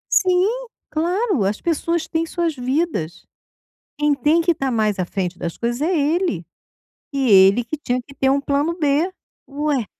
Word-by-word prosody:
Sim, 370 -1 +4 0.4
claro. 350 - 0
As 200 +2 -1
pessoas 335 0 -1
têm 325 0 -1
suas 335 -3 -1
vidas, 255 - -2 0.7
quem 295 -1 +3
tem 300 +5 +2
que 340 +1 +3
estar 275 -4 -2
mais 215 -3 +1
à - - +1
frente 180 -1 -3
das 170 - -5
coisas 240 +2 -2
é 345 +4 +1
ele, 295 - 0 0.7
e 270 -3 +1
ele 195 +4 +6
que 310 +7 -5
tinha 250 -3 -2
que 275 +3 -16
ter 265 0 +2
um 280 - +1
plano 285 +4 0
B, 300 +5 +2 0.4
ué. 285 -4 -1
285 Hz, 170 wpm, -21 LUFS, 240-330 Hz, 0.7 s, ele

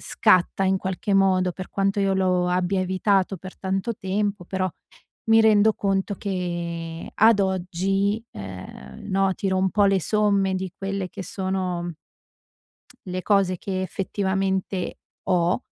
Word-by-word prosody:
scatta 185 +2 +2
in 190 0 +3
qualche 195 +3 -2
modo, 185 -2 +3
per 185 +1 -8
quanto 195 +1 0
io 195 -1 +2
lo 180 -1 +2
abbia 180 +1 +1
evitato 190 +1 +1
per 185 +2 -10
tanto 195 +4 -2
tempo, 200 0 -2
però 185 +1 -1 0.6
mi 225 0 +7
rendo 220 0 +5
conto 195 0 -1
che 170 -3 -4
ad 220 -1 +5
oggi, 195 +3 0
ehm, 90 -9 -9
no, 195 0 +2
tiro 190 -1 -1
un 190 0 +2
po' 205 -1 +3
le 195 -1 +3
somme 200 -1 +2
di 185 -1 -4
quelle 195 -1 -3
che - - -7
sono, 185 -2 -2
mhmm, 175 - -4 1.2
le 185 0 -3
cose 195 -3 +2
che 190 -1 -3
effettivamente 190 0 -2 0.3
ho. 180 +5 +2
190 Hz, 140 wpm, -24 LUFS, 180-195 Hz, 1.2 s, mi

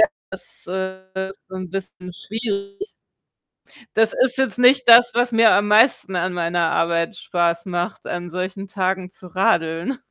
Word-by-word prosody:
ja, 330 - +7 0.2
das, 190 -2 -8
äh, 190 +1 -5
ist 195 - -14
'n 185 -1 -6
bisschen 185 -1 -7
schwierig. 200 - -5 1.1
Das 225 0 +3
ist 255 0 +1
jetzt 265 -4 -1
nicht 255 +1 +5
das, 240 +1 +7
was 245 0 +1
mir 225 -1 +5
am 205 0 +2
meisten 210 -3 +3
an 180 +1 -1
meiner 170 -1 0
Arbeit 170 0 0
Spaß 170 -1 -1
macht, 175 -1 -4
an 175 0 -5
solchen 185 +3 -5
Tagen 185 -1 -2
zu 185 - -14
radeln. 180 +2 0
190 Hz, 155 wpm, -21 LUFS, 180-225 Hz, 1.1 s, ja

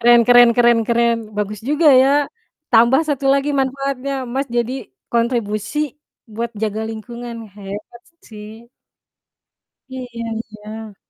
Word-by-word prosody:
Keren 240 0 +6
keren 245 -1 +8
keren 240 -1 +5
keren, 235 0 +3 0.2
bagus 210 0 -3
juga 300 +1 +4
ya. 270 - +3 0.6
Tambah 235 +4 +5
1 280 -2 -1
lagi 280 +1 +1
manfaatnya, 275 0 -2 0.2
Mas 275 +1 -1
jadi 240 +1 0 0.4
kontribusi 230 +1 -1 0.6
buat 235 +1 -3
jaga 215 0 -1
lingkungan, 235 +2 -7 0.2
hebat 205 +4 -9 0.3
sih. 220 +2 -11 1.2
Iya 260 0 -6 0.2
iya. 220 -2 -7
235 Hz, 115 wpm, -19 LUFS, 220-255 Hz, 1.2 s, keren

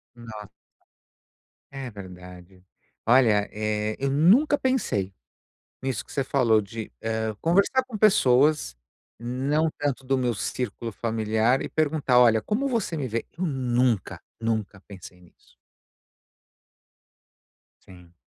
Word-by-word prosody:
Nos 110 -3 -10 1.2
É 135 -2 -6
verdade. 90 -2 -12 0.4
Olha, 115 -4 +4
eh, 105 0 -2
eu 135 0 -1
nunca 205 - +4
pensei 105 - -1 0.7
nisso 135 -2 -2
que - - -17
você 135 - -1
falou 125 -5 +3
de, 110 +2 -7
hã, 110 -1 -2
conversar 200 +10 +2
com 235 - -8
pessoas, 150 - +3 0.4
não 135 +6 0
tanto 140 -2 -2
do 135 +1 0
meu 125 -2 0
círculo 115 +1 -4
familiar 110 +3 0
e - - -4
perguntar: 150 -5 +1
"Olha, 115 -3 +5
como 230 - -1
você 225 - -2
me 135 - -2
vê?". 115 0 -2
Eu 185 - -1
nunca, 125 - 0 0.2
nunca 110 -3 -2
pensei 95 -2 -12
nisso. 90 - -24 2.3
Sim. 90 -2 -16
120 Hz, 120 wpm, -25 LUFS, 105-140 Hz, 2.3 s, Olha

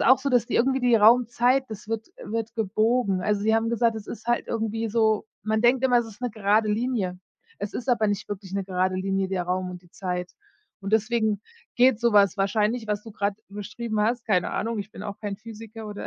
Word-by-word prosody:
auch 260 +2 +6
so, 280 +1 -2
dass 245 -2 +3
die - - -4
irgendwie 265 +2 +2
die 245 -1 +4
Raumzeit 245 +4 +4
das 215 -1 -8
wird 225 0 -3 0.2
wird 225 +1 -3
gebogen. 215 -1 +1
Also, 210 +1 +1
sie 220 +1 +3
haben 225 0 +1
gesagt, 235 0 +2
es 210 - -8
ist 225 0 -8
halt 240 0 +1
irgendwie 225 0 -2
so 220 -1 +2 0.2
man 220 +2 0
denkt 250 +2 +4
immer, 245 -2 +5
es 235 - -1
ist 220 0 -13
'ne 245 -2 -2
gerade 215 +1 +2
Linie. 210 -6 -1 0.4
Es 205 0 -4
ist 255 - -5
aber 230 -3 +3
nicht 205 +1 -2
wirklich 195 -2 -6
'ne 195 -1 -1
gerade 185 0 0
Linie, 195 0 -1
der 185 -2 -1
Raum 180 +1 -2
und 180 -1 -9
die 175 - -22
Zeit. 180 -1 -4 0.5
Und 195 +2 -4
deswegen 220 -1 +1 0.4
geht 250 -2 +4
so 235 -2 +2
was 200 -1 +5
wahrscheinlich, 215 +4 +1
was 210 0 -2
du 225 - -10
grad 200 -1 -1
beschrieben 210 +2 -4
hast. 235 +3 0
Keine 185 -5 +1
Ahnung, 225 +1 -2
ich 205 +1 -5
bin - - -10
auch 200 -1 -6
kein 205 -2 -4
Physiker 225 0 -10
oder 205 -1 -6
215 Hz, 225 wpm, -25 LUFS, 200-235 Hz, 0.5 s, auch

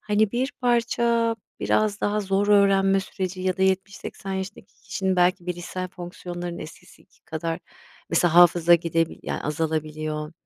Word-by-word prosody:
hani, 210 0 +1
bir 255 +3 -1
parça 235 -1 +2 0.2
biraz 215 -1 +1
daha 210 +1 +1
zor 195 +1 0
öğrenme 195 -1 +4
süreci 190 -1 -5
ya 185 -1 0
da 190 - 0
70-80 190 +1 -2
yaşındaki 190 +1 -6
kişinin 190 -2 -1
belki 180 0 +2
bilişsel 180 +1 -4
fonksiyonlarının 175 -1 -7
eski 155 - -13
kadar 165 +1 -3 0.5
mesela 170 0 +2
hafıza 175 -1 +7
gidebil 165 -1 0
ya, - - -4
azalabiliyor. 155 0 -3
185 Hz, 130 wpm, -24 LUFS, 170-205 Hz, 0.5 s, hafıza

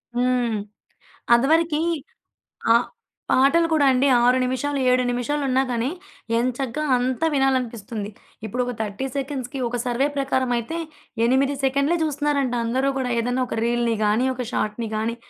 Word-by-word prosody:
హ్మ్. 245 -2 +1 0.8
అదివరకి. 310 +5 +3 0.9
ఆహ్, 235 +1 +4 0.4
పాటలు 280 +6 +4
గూడా 300 -3 +4
అండి 260 +2 +3
6 250 +1 +4
నిమిషాలు, 265 +3 -1
7 255 0 +3
నిమిషాలు 245 +5 -1
ఉన్నా 260 +1 +3
గానీ, 240 +1 0 0.5
ఎం 240 - +1
చక్కగా 270 +2 -2
అంతా 255 +5 0
వినాలనిపిస్తుంది. 235 -6 -1 0.4
ఇప్పుడు 250 +4 -2
ఒక 245 - -2
30 220 +5 -3
సెకండ్స్‌కి 270 -2 -4
ఒక 245 +1 -3
సర్వే 250 +4 +1
ప్రకారం 260 -2 0
అయితే, 320 +9 -4 0.5
8 270 +3 +2
సెకండ్లే 280 +5 +2
చూస్తున్నారంట, 290 -3 0
అందరూ 260 +4 +1
గూడా. 250 -2 -1
ఏదైనా 245 +2 0
ఒక 225 - -3
రీల్‌ని 235 -1 +1
గానీ, 215 +5 +2
ఒక 250 - -4
షాట్‌ని 215 +2 -2
గానీ, 225 +2 -2
255 Hz, 140 wpm, -23 LUFS, 235-275 Hz, 0.9 s, ఆహ్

